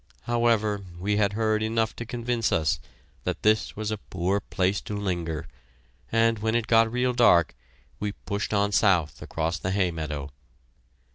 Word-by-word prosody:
However, 115 -3 +1 0.2
we 105 +3 0
had 100 -1 +2
heard 110 0 +1
enough 110 0 0
to 120 - -6
convince 120 -1 -1
us 80 -4 +1 0.4
that - - -3
this 110 +1 +2
was 110 0 -3
a 110 - -3
poor 95 +1 -1
place 95 0 -1
to 105 - -5
linger, 85 -5 -3 0.6
and 115 -1 +3
when 110 +2 0
it 120 -1 +1
got 115 0 +4
real 125 +1 +1
dark, 100 -9 +5 0.5
we 105 -1 -2
pushed 100 0 -4
on 100 -1 +2
south 85 - +2
across 80 +1 -2
the 90 - -3
hay 95 -2 +1
meadow. 75 -3 -5
105 Hz, 160 wpm, -26 LUFS, 90-115 Hz, 0.6 s, dark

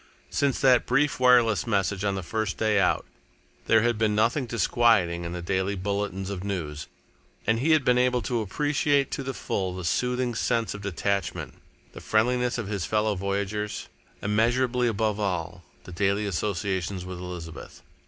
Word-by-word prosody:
Since 140 -2 +1
that 125 -2 +4
brief 135 +3 +2
wireless 120 -6 +4
message 100 -2 0
on 100 -1 0
the 95 - -4
first 110 +2 -2
day 110 -2 +2
out, 90 - +2 0.6
there 110 0 +5
had 120 -2 +1
been 110 -2 +2
nothing 120 +5 +1
disquieting 115 -7 +2
in 85 - -4
the 90 -1 -5
daily 95 +2 0
bulletins 100 0 -3
of 95 -2 -5
news, 80 -7 -4 0.6
and 115 +1 +2
he 145 +6 0
had 155 -4 +3
been 125 -1 +4
able 125 -2 +2
to 115 +3 -1
appreciate 145 +5 +1
to - - -3
the 135 -1 -4
full 95 -2 -2
the 95 - -6
soothing 125 - 0
sense 115 0 0
of 105 - -8
detachment, 100 -1 -2 0.4
the - - -9
friendliness 125 +3 +1
of 115 -4 -4
his 100 -3 -2
fellow 105 +3 +1
voyagers, 100 +2 -3 0.3
immeasurably 120 +4 +2
above 110 -2 0
all 90 -3 -2 0.2
the - - -11
daily 100 +3 0
association 95 -1 -2
with 90 -1 -6
Elizabeth. 90 -2 -8
105 Hz, 165 wpm, -26 LUFS, 95-120 Hz, 0.6 s, there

